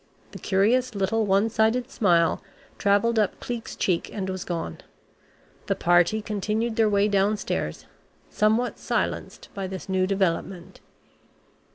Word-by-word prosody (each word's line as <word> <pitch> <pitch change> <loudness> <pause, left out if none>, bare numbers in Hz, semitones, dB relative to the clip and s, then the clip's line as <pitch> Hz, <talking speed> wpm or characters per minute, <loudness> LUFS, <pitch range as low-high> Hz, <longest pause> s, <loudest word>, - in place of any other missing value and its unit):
The - - -9
curious 230 +5 +1
little 205 +3 0
one 195 +3 +3
sided 230 +3 +1
smile 175 -9 +2 0.4
travelled 205 +3 +2
up 210 - 0
Cleek's 240 -2 -5
cheek 175 -3 0
and 190 -2 -3
was 185 -1 -4
gone. 165 - -4 0.9
The - - +1
party 175 +5 +3
continued 215 +2 -2
their 220 -1 +3
way 200 0 +3
downstairs, 200 +1 -1 0.4
somewhat 220 +3 +1
silenced - - -3
by 195 -1 -4
this 185 -1 -7
new 190 -1 +1
development. 190 -1 -2
200 Hz, 130 wpm, -25 LUFS, 190-220 Hz, 0.9 s, one